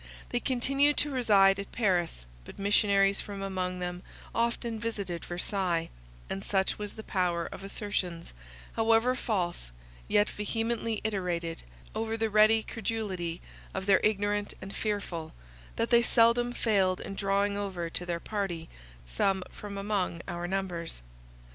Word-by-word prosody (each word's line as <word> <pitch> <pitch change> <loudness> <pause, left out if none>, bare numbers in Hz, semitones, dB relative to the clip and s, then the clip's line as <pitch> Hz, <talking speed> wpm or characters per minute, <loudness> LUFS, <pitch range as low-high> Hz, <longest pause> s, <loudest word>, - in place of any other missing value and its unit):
They 245 - 0
continued 275 +3 +2
to 295 - +1
reside 200 -6 +5
at 200 - -6
Paris; 175 - +1 0.2
but - - -11
missionaries 200 -1 +3
from 200 -1 -6
among 185 -2 -2
them 180 0 -4 0.3
often 235 -1 0
visited 200 -7 -3
Versailles—and 165 - -3
such 190 0 +1
was 205 -1 -4
the 220 - -7
power 175 -4 0
of 195 - -8
assertions, 195 -4 -3 0.4
however 225 +2 +4
false, 180 - -2 0.4
yet 205 0 +4
vehemently 225 +1 -1
iterated, 180 -6 -2 0.3
over 225 +1 -1
the 225 -1 0
ready 215 +1 +6
credulity 195 -7 -3 0.3
of 190 0 -2
the 195 -1 +4
ignorant 205 -1 +1
and 195 +1 -8
fearful, 200 -7 -3 0.4
that 230 - -1
they 235 0 +7
seldom 235 +1 +4
failed 195 -6 +2
in - - -6
drawing 200 +1 +1
over 190 -4 -2
to 180 - -4
their 175 -1 -2
party 175 -5 -3 0.4
some 190 - +1
from 205 -1 -7
among 195 -4 -1
our 175 -1 -3
numbers. 175 - -3
200 Hz, 135 wpm, -30 LUFS, 180-220 Hz, 0.4 s, they